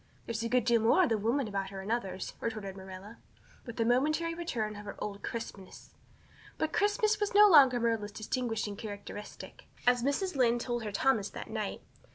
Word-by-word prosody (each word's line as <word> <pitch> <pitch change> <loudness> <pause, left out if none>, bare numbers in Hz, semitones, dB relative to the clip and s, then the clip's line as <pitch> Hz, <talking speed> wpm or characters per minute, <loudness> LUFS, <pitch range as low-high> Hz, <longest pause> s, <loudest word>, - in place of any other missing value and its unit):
"There's 230 -1 -3
a 230 - -2
good 245 -1 +2
deal 235 -1 +4
more 235 +12 +5
of 330 - +2
the 225 - +2
woman 235 +5 0
about 195 -2 -3
her 195 0 -7
in 195 +3 -5
others," 195 -5 -3
retorted 215 -4 -4
Marilla, 190 +3 -10 0.5
with 235 0 -7
a 230 - +2
momentary 305 +7 +2
return 240 -11 -3
of 205 - -8
her 200 - -6
old 200 -1 -5
crispness. 200 -5 -7 0.6
But 315 0 -1
crispness 420 +1 +2
was 415 -1 -1
no 420 +1 +9
longer 275 -9 +7
Marilla's 225 -3 0
distinguishing 220 -1 -3
characteristic. 205 0 -9 0.2
As 245 0 +4
Mrs. 285 +8 -1
Lynde 240 -2 +3
told 240 -2 -2
her 210 - -3
Thomas 210 -1 +1
that - - -8
night. 215 -2 -4
230 Hz, 190 wpm, -31 LUFS, 210-265 Hz, 0.6 s, no